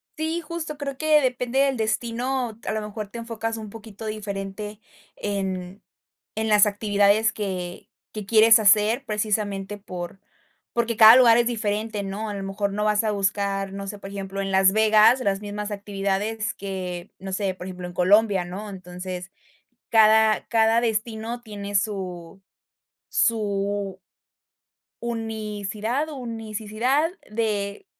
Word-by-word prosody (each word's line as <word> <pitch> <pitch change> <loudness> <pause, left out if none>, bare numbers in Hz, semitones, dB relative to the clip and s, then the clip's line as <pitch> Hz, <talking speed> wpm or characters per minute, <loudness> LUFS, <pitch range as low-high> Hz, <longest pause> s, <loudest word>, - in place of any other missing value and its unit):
Sí, 320 +2 -2
justo 320 -2 -6
creo 275 -2 -4
que 310 0 +4
depende 250 0 0
del 275 -2 +2
destino, 235 +2 -2
a - - -1
lo 215 0 -2
mejor 210 0 -6
te 235 - -7
enfocas 225 -1 -4
un 215 -1 -7
poquito 220 0 -10
diferente 205 0 -5 0.4
en 190 -2 -4 0.5
en 220 0 -1
las 210 -1 +6
actividades 205 +1 +2
que 185 -4 -5 0.3
que 215 -2 -6
quieres 225 +2 +7
hacer, 215 +5 +4
precisamente 205 -2 -2
por 185 -2 -7 0.5
porque 235 -1 0
cada 220 +1 +10
lugar 235 -2 +7
es 235 - +3
diferente, 215 -2 -2
¿no? 205 +3 -4
A 205 - -4
lo 195 - -5
mejor 195 +1 -2
no 210 - -1
vas 210 0 +2
a 215 - +1
buscar, 195 -1 -1
no 200 0 -6
sé, 205 - -6
por 195 - -8
ejemplo, 195 0 -5
en 195 0 -3
Las 190 0 +5
Vegas 220 +3 +5
las 200 -4 0
mismas 210 0 -5
actividades 205 +2 -2
que, 185 -2 -6
no 190 0 -6
sé, 195 -1 -1
por 180 - -9
ejemplo, 180 -1 -6
en 175 - -9
Colombia, 195 +1 +3
¿no? 200 +4 -7
Entonces, 180 0 -7 0.6
cada 220 -1 +5
cada 225 0 +3
destino 225 +1 -2
tiene 205 -3 -7
su 190 -3 -3 0.7
su 200 -3 0 1.0
unicidad 220 +3 -3
unicidad 230 +3 -1 0.2
de 210 - -2
210 Hz, 140 wpm, -24 LUFS, 195-225 Hz, 1.0 s, cada